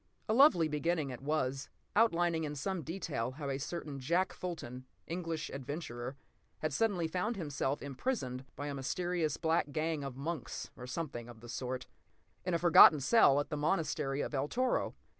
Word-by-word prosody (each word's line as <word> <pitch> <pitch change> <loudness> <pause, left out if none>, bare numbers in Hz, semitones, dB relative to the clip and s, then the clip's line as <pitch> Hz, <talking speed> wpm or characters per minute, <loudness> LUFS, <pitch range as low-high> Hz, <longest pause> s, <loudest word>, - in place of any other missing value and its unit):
A 215 - +2
lovely 225 - +6
beginning 155 -1 0
it 125 - -7
was, 140 -2 -1 0.3
outlining 175 -7 +3
in 150 -1 -3
some 185 +5 -2
detail 155 -7 -3
how 140 0 -4
a 135 - -2
certain 150 -2 -5
Jack 175 +7 +1
Fulton, 130 -8 -6 0.2
English 165 -2 -3
adventurer, 135 -2 -5 0.4
had 155 - -2
suddenly 200 -7 +1
found 185 +8 -1
himself 145 -5 -2
imprisoned 135 - -2
(by 145 - -5
a 145 - -3
mysterious 160 +3 -1
black 160 -2 +1
gang 155 0 -1
of 135 -2 -6
monks, 140 -3 -4
or 125 - -9
something 125 -5 -4
of 115 -2 -12
the 120 - -11
sort) 130 +1 -4 0.6
in 180 -1 0
a - - +4
forgotten 165 -3 +8
cell 140 - +5
at 145 - -2
the 150 - -2
monastery 150 -3 0
of - - -4
El 140 +1 0
Toro. 255 +8 0
155 Hz, 170 wpm, -33 LUFS, 135-175 Hz, 0.6 s, forgotten